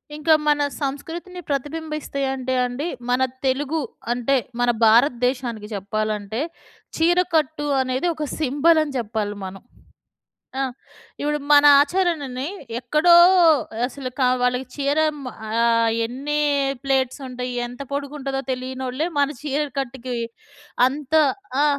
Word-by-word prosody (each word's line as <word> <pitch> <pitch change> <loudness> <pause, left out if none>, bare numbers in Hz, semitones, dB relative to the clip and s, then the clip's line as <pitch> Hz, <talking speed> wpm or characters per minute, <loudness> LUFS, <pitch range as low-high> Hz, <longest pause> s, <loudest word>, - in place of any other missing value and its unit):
ఇంకా 310 +1 +3
మన 295 0 +3 0.2
సంస్కృతిని 330 +6 -5
ప్రతిబింబిస్తేయంటే 275 -3 -3
అండి. 255 +7 -3 0.2
మన 250 +1 +2 0.2
తెలుగు 290 +4 0 0.3
అంటే, 245 +3 +1 0.2
మన 245 - +2 0.2
భారతదేశానికి 240 -1 +2
చెప్పాలంటే, 215 +3 -2 0.6
చీరకట్టు 325 -3 +1
అనేది 260 +6 -1
ఒక 305 - -3
సింబలని 300 +1 +2
జెప్పాలి 215 -3 -2
మనం. 190 +1 -8 1.0
ఆ! - - +2 0.6
ఇప్పుడు 295 +1 0
మన 290 0 +7 0.2
ఆచరణని 290 -5 0 0.3
ఎక్కడో 305 +8 +3 0.7
అసలు 260 0 -6
కా‌ 255 - +4
వాళ్ళకి 250 +1 +1
చీరెం 300 +2 +1 0.3
ఆహ్, 230 +1 +2 0.2
ఎన్నీ 280 +5 -3 0.5
ప్లేట్సుంటాయి, 260 -2 -1
ఎంత 245 +3 -10
పొడుగుంటదో 280 -1 -3
తెలీ‌యనోళ్ళే 260 +4 -3
మన 280 - +4
చీర 295 0 -1 0.2
కట్టుకి 255 -1 -4 0.7
అంత 285 +2 -6 0.5
ఆ! - - +4
270 Hz, 100 wpm, -22 LUFS, 250-300 Hz, 1.0 s, మన